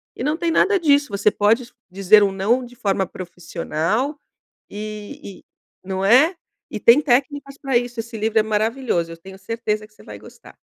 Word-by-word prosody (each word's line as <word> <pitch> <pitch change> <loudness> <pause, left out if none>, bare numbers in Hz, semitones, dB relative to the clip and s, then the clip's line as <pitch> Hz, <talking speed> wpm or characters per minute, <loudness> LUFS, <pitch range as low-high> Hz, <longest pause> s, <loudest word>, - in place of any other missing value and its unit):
E - - -6
não 300 +3 0
tem 340 -1 -1
nada 390 +4 +3
disso, 285 -5 +3
você 200 +1 +2
pode 230 +4 +1 0.2
dizer 195 +2 +5
um 195 - +1
não 220 +7 0
de 245 0 -15
forma 195 -5 0
profissional 180 - -3 0.5
e 210 -2 -8
e - - -34 0.4
não 190 0 -3
é? 275 - +5 0.4
E - - -4
tem 235 +5 +6
técnicas 275 +1 0
para 270 -3 -1
isso 240 -1 -1
esse 225 0 -8
livro 220 +1 0
é - - +4
maravilhoso 215 -5 -1
eu - - -9
tenho 190 +3 -13
certeza 215 +1 -3
que 215 - -31
você - - -19
vai 105 -1 -10
gostar. 105 - -16
220 Hz, 185 wpm, -21 LUFS, 195-260 Hz, 0.5 s, tem